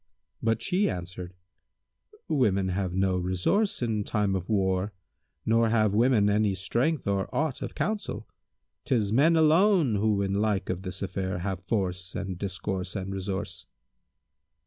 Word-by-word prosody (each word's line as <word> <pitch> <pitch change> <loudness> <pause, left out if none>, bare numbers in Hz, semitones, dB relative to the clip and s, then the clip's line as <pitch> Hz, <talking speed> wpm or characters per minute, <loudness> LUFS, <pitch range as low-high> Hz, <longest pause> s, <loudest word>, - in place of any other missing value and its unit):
but 115 0 0
she 195 +2 +2
answered, 90 0 -6 0.9
"Women 100 -10 +2
have 95 0 -1
no 95 0 +1
resource 95 - 0
in 110 -3 0
time 105 -2 0
of 90 +1 -4
war, 95 -1 +1 0.5
nor 115 0 +3
have 110 -3 +2
women 115 -1 +4
any 105 -1 +2
strength 120 - -1
or 100 -1 0
aught 155 -4 -1
of - - -5
counsel. 215 -1 -3 0.6
'Tis 110 -5 +1
men 155 +7 +5
alone 160 - +4
who 105 -1 +1
in 95 0 -1
like 100 -2 0
of 90 0 -4
this 90 0 -5
affair 95 -1 -2
have 95 +1 -3
force 95 -2 -2
and 95 -2 -4
discourse 95 0 -3
and 95 0 -4
resource." 95 0 -4
100 Hz, 145 wpm, -27 LUFS, 95-115 Hz, 0.9 s, men